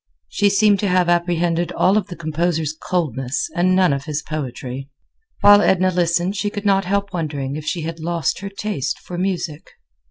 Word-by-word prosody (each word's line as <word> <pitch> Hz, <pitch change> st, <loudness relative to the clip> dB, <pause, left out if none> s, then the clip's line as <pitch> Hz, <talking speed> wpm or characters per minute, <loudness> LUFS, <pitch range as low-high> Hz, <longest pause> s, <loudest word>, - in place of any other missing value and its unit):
She 205 Hz, -1 st, +2 dB
seemed 205 Hz, 0 st, +4 dB
to 205 Hz, -, 0 dB
have 180 Hz, -1 st, +2 dB
apprehended 175 Hz, 0 st, +1 dB
all 190 Hz, +3 st, +3 dB
of 215 Hz, -3 st, +1 dB
the 180 Hz, -, -8 dB
composer's 160 Hz, -1 st, -1 dB
coldness 140 Hz, -6 st, -2 dB
and 185 Hz, +1 st, +3 dB
none 185 Hz, -5 st, +4 dB
of 140 Hz, 0 st, -4 dB
his 150 Hz, -1 st, -3 dB
poetry. 135 Hz, -2 st, -5 dB, 0.5 s
While 205 Hz, 0 st, +8 dB
Edna 185 Hz, -2 st, +3 dB
listened 175 Hz, +2 st, +1 dB
she 205 Hz, +1 st, -1 dB
could 205 Hz, 0 st, -6 dB
not 195 Hz, -1 st, +3 dB
help 200 Hz, +1 st, -1 dB
wondering 145 Hz, -5 st, -3 dB
if 155 Hz, 0 st, -6 dB
she 170 Hz, -, -2 dB
had 165 Hz, +1 st, -5 dB
lost 170 Hz, 0 st, -1 dB
her 200 Hz, -, -6 dB
taste 195 Hz, -9 st, -3 dB
for 175 Hz, -1 st, -7 dB
music. 175 Hz, -5 st, -3 dB
175 Hz, 185 wpm, -20 LUFS, 155-195 Hz, 0.5 s, While